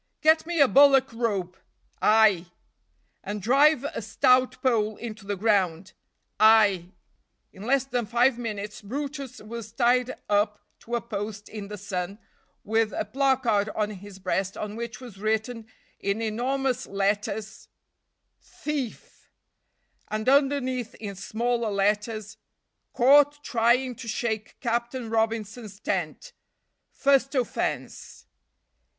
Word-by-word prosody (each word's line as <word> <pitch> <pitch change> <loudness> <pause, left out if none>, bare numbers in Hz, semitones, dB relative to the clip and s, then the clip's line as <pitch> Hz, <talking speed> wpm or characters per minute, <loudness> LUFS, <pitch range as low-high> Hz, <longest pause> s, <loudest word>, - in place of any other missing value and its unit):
"Get 315 +1 +4
me 345 -2 -1
a 280 - +7
bullock 270 -2 +5
rope." 200 -6 -2 0.5
"Ay!" 210 -5 +4 0.8
"And 210 +1 -4
drive 275 - +4
a 285 - -4
stout 255 +4 +2
pole 220 -4 +2
into 220 -3 -8
the 205 - -1
ground." 190 -3 0 0.5
"Ay!" 205 -5 +5 0.6
In 190 - -13
less 270 0 +3
than 245 -4 -2
five 240 +3 +3
minutes 210 -3 -5
brutus 275 +3 -5
was 225 0 -8
tied 245 +2 +2
up 205 0 +1 0.2
to 240 - -4
a 235 - -1
post 210 -2 -6
in 210 -2 -7
the 210 +1 -7
sun, 190 -1 -4 0.5
with 220 0 +1
a - - -2
placard 240 -3 +1
on 210 -1 0
his 200 -1 -10
breast 190 0 -2
on 210 0 -5
which 230 -1 -6
was 235 -6 -11
written 220 +2 -2 0.3
in 200 +2 -1
enormous 255 +4 -1
letters 205 +2 -2 0.7
THIEF 285 -6 -6 0.8
(and 215 +1 -4
underneath 260 -3 +2
in 205 -2 -6
smaller 230 +4 -1
letters 210 +1 -1 0.3
) - - -53
Caught 290 +3 +5
trying 245 +2 +2
to 240 -2 -9
shake 220 -1 -3
Captain 235 0 -2
Robinson's 220 -2 -2
tent. 190 - -3 0.6
First 275 0 +2
offense. 250 -3 -3
225 Hz, 120 wpm, -26 LUFS, 205-255 Hz, 0.8 s, a